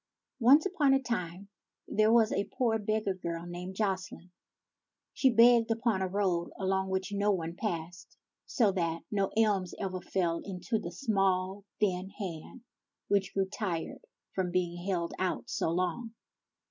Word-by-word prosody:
1 250 +3 +8
O - - +8
NCE - - -10
upon 300 -8 +3
a - - +3
time 200 -7 -4 0.4
there 215 +1 +3
was 225 -2 +5
a 200 - -1
poor 230 -3 +2
beggar 215 -1 0
girl 170 -2 -5
named 180 +2 -7
Jocelyne. 190 -3 -3 0.8
She 265 - +4
begged 235 0 +6
upon 225 -3 +1
a 190 - +1
road 185 -3 0
along 190 0 0
which 190 +1 -2
no 200 +1 +1
one 170 -4 -1
passed, 175 -3 -5 0.3
so 220 -6 +3
that 170 -3 -2
no 195 -2 +1
alms 205 -5 +2
ever 185 -2 -3
fell 170 -3 -1
into 190 +3 -3
the 170 -4 -6
small, 195 -2 0
thin 190 -2 0
hand 175 +1 -7 0.5
which 195 -2 +1
grew 195 -1 +2
tired 190 - -4 0.3
from 185 -2 -1
being 175 -1 -1
held 170 -3 -1
out 185 -1 -2
so - - 0
long. 185 +7 -2
190 Hz, 160 wpm, -30 LUFS, 180-215 Hz, 0.8 s, 1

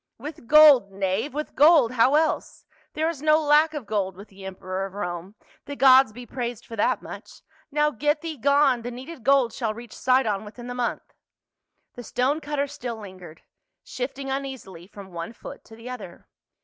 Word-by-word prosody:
" - - -61
With 300 -4 -9
gold, 290 -8 +7
knave, 195 +7 -2
with 300 +3 -5
gold, 295 -4 +5
how 255 +3 +3
el.se? 315 +1 -1 0.3
There 315 +1 0
is 330 -4 -4
no 310 0 +4
lack 305 +1 +3
of 285 -6 -5
gold 200 -3 -2
with 200 +3 -13
the 195 0 -13
emperor 185 0 -5
of 195 - -15
Rome 180 0 -5
— - - -31
the 285 - -5
gods 265 -2 +6
be 245 +3 -10
praised 240 -2 -5
for 230 - -9
that 205 - 0
much. - - -11 0.3
Now 300 +1 +1
get 295 +4 0
thee 330 -1 -5
gone; 280 -1 +3
the 240 - -5
needed 255 +3 -9
gold 270 -4 +3
shall 225 -4 -3
reach 235 0 -11
Sidon 245 -6 +1
within 225 +3 -11
the 245 - -5
month." 245 -1 -4 0.8
The 245 - -9
stone 265 +7 0
cutter 290 -1 -2
still 250 -4 -6
lingered, 185 -6 -12 0.4
shifting 270 +1 -5
uneasily 260 -11 -6
from 200 -2 -12
one 170 +5 -6
foot - - -11
to 225 - -14
the 230 +3 -9
other. 205 -9 -10
245 Hz, 190 wpm, -24 LUFS, 205-285 Hz, 0.8 s, gold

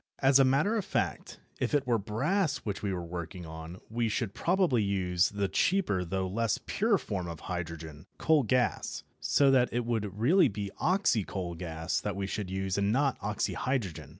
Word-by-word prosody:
As 135 0 +5
a - - +7
matter 140 +12 +3
of 210 - -1
fact, - - -2 0.2
if - - 0
it 145 - +1
were 120 -2 +2
brass 145 - 0
which 100 -2 -3
we 100 - -1
were 90 -2 -3
working 85 +1 -6
on 80 +2 -8
we 115 0 -1
should 105 -1 -2
probably 175 - +2
use 95 -2 +1
the 100 -1 -1
cheaper 170 - +1
though 95 +2 -2
less 115 +3 0
pure 215 0 +2
form 95 - -4
of 85 -2 -7
hydrogen 80 -3 -6
coal 160 -2 +4
gas 125 +1 0 0.2
so 140 -1 +3
that 125 -2 +4
it 120 +1 -1
would 105 -4 -2
really 160 - +5
be 100 -3 -4
"oxycoal 105 - +1
gas" 80 -1 -3
that 105 -3 -3
we 100 0 -2
should 100 -1 -4
use 95 +1 -1
and 100 +1 +2
not 135 +2 +1
oxyhydrogen. 105 - -2
105 Hz, 180 wpm, -30 LUFS, 90-130 Hz, 0.2 s, a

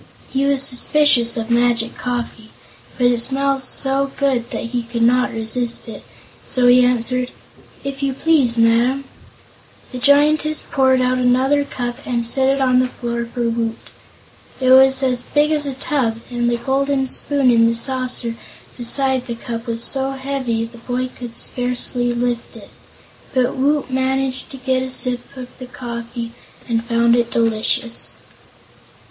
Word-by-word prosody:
He 270 +1 +1
was 275 -1 +2
suspicious 250 -2 +3
of 225 0 -3
magic 235 -1 +1
coffee, 240 -3 -5 0.5
but 245 - +1
it 245 -1 +3
smelled 275 +2 +1
so 270 +1 0
good 265 -4 0
that - - -4
he 245 -1 -1
could 235 0 -3
not 250 +2 +3
resist 230 +2 -2
it; 225 - -9 0.4
so 250 -1 0
he 250 0 +6
answered: 250 +1 0 0.5
"If 275 0 -5
you 275 -1 0
please, 270 -5 +2
Madam." 235 +4 +3 0.9
The 250 - -5
Giantess 300 +3 +3
poured 260 -1 +2
out 255 0 +1
another 260 +3 +2
cup 245 -3 -5
and 235 -2 -2
set 265 +3 +1
it 275 0 +1
on 255 -1 +3
the 255 - +2
floor 235 -1 -4
for 240 -1 -2
Woot. 230 -1 -2 0.8
It 255 -1 +2
was 265 +1 +6
as 250 -2 +1
big 295 +4 +1
as 295 -2 +1
a 270 - -4
tub, 255 -5 -1
and 240 0 0
the 240 - 0
golden 270 +1 0
spoon 275 -1 +2
in 230 -1 +4
the 230 - +1
saucer 255 -1 -1 0.4
beside 260 +1 +1
the 235 - -4
cup 230 +1 -6
was 230 0 -2
so 270 +1 0
heavy 265 -4 -2
the 235 +1 -13
boy 250 +2 -3
could 240 -2 -8
scarcely 245 0 -2
lift 240 0 -2
it. - - -13 0.6
But 255 -1 +1
Woot 280 0 0
managed 260 0 -1
to 270 - -9
get 260 0 0
a 260 - -4
sip 250 -1 +1 0.2
of 250 -1 -9
the 255 - -8
coffee 235 -1 -6 0.4
and 230 -1 0
found 235 0 +3
it 235 -1 +1
delicious. 230 +2 -1
Mrs. - - -27
250 Hz, 165 wpm, -19 LUFS, 235-265 Hz, 0.9 s, he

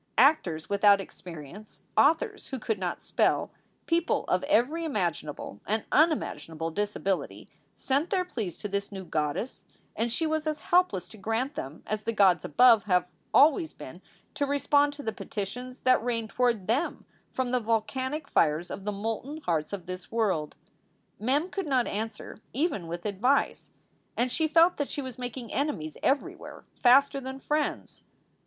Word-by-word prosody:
Actors 190 - +3
without 200 0 +5
experience, 180 +1 -10
authors 315 +3 +2
who 265 - -4
could 220 -3 -2
not 180 -2 -3
spell, - - +1 0.3
people 335 0 +1
of - - +2
every 300 +3 +2
imaginable 175 - -3
and 215 +1 0
unimaginable 165 - +1
disability, 195 0 -2 0.3
sent 280 +5 0
their 370 -2 +1
pleas 215 - -4
to - - -5
this 200 0 -3
new 190 -1 -6
goddess, 155 - -2 0.3
and 230 +1 -1
she 320 +7 0
was 315 0 -1
as 305 -1 -2
helpless 345 - +2
to 215 - -13
grant 225 +8 -1
them 140 - -7
as 215 0 -2
the 230 - -2
gods 190 -6 +4
above 230 - +5
have 180 -3 +3 0.3
always 315 +2 +5
been - - -10 0.3
to 285 - -1
respond 285 +1 +3
to 285 0 -9
the 220 - -2
petitions 245 +5 -6
that 255 -3 +4
rain 230 -2 -1
toward 235 -4 +1
them 255 - -1 0.2
from 255 -1 -2
the 250 - +2
volcanic 260 +6 -1
fires 160 +2 +1
of 195 - -6
the 210 - 0
molten 225 +8 -4
hearts 160 - -1
of 195 -4 -5
this 185 0 -7
world. 195 -10 0 0.6
Mem 270 - +1
could 390 -5 -3
not 260 -4 +2
answer 220 +1 -5
even 275 - -1
with 170 +1 -6
advice. 230 +7 +1 0.5
And 245 +1 +1
she 320 +4 +1
felt 330 +3 +5
that 285 - -2
she 285 - -3
was 255 -2 -8
making 245 -2 -6
enemies 170 - -2
everywhere 275 +1 -2 0.2
faster 275 +2 +5
than 265 +1 -6
friends. 295 +2 -2
230 Hz, 160 wpm, -28 LUFS, 195-285 Hz, 0.6 s, without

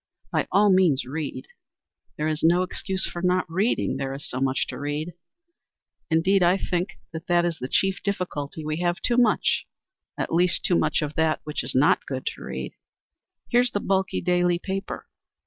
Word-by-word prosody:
By - - 0
all 205 0 +5
means 180 -8 +4
read. 145 +3 -5 0.7
There 150 - -1
is 155 0 -1
no 175 +3 +4
excuse 190 +1 -2
for 175 - -5
not 180 0 +2
reading, 190 - 0
there 135 0 -3
is 140 - -7
so 130 - -3
much 135 0 +1
to - - -6
read. 150 +4 -3 1.0
Indeed 185 +5 +3
I 180 +2 +4
think 180 0 -2 0.2
that 175 +1 +1
is 170 -3 -2
the 125 - -4
chief 190 +7 +1
difficulty, 160 -6 -3
we 155 0 -2
have 175 0 0
too 240 - +2
much, 240 -3 +2 0.5
at - - -3
least 175 +1 +3
too 180 - +3
much 155 -1 +1
of 150 0 -3
that 160 -1 +2
which 150 0 -3
is 125 +1 -2
not 135 +3 +3
good 130 -1 -4
to - - -14
read. 65 0 -5 0.8
Here's 245 +1 +4
the 205 - -2
bulky 190 -1 0
daily 175 -1 +2
paper. 195 +2 -5
175 Hz, 180 wpm, -25 LUFS, 150-190 Hz, 1.0 s, all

